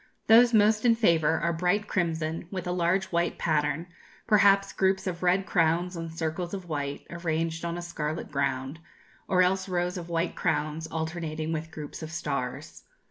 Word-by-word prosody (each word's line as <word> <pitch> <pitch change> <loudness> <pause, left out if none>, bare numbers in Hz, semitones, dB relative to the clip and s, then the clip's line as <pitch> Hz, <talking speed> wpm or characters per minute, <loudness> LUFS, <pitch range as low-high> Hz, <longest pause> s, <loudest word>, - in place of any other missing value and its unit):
Those 235 +2 +7
most 215 -1 +4
in 235 -2 +5
favour 165 -8 +3
are 170 +2 +1
bright 180 +5 0
crimson, 165 -3 -2
with 185 -1 -5
a 180 - -2
large 180 +2 +1
white 170 0 0
pattern, 150 0 0 0.4
perhaps 200 -2 +4
groups 190 0 +1
of 175 -2 -3
red 185 +2 +2
crowns 175 +1 +1
on 165 -1 -5
circles 165 +3 -3
of 190 -2 -8
white, 145 -3 -4
arranged 165 -1 -2
on 170 0 -3
a 175 - -5
scarlet 155 -3 -4
ground, 135 +1 -2 0.5
or 185 -1 +4
else 190 +1 0
rows 180 0 -1
of 170 0 -9
white 170 +1 -1
crowns 160 -1 -1
alternating 160 -1 -3
with 160 0 -4
groups 155 0 -8
of 160 0 -6
stars. 140 -3 -4
170 Hz, 170 wpm, -27 LUFS, 160-185 Hz, 0.5 s, Those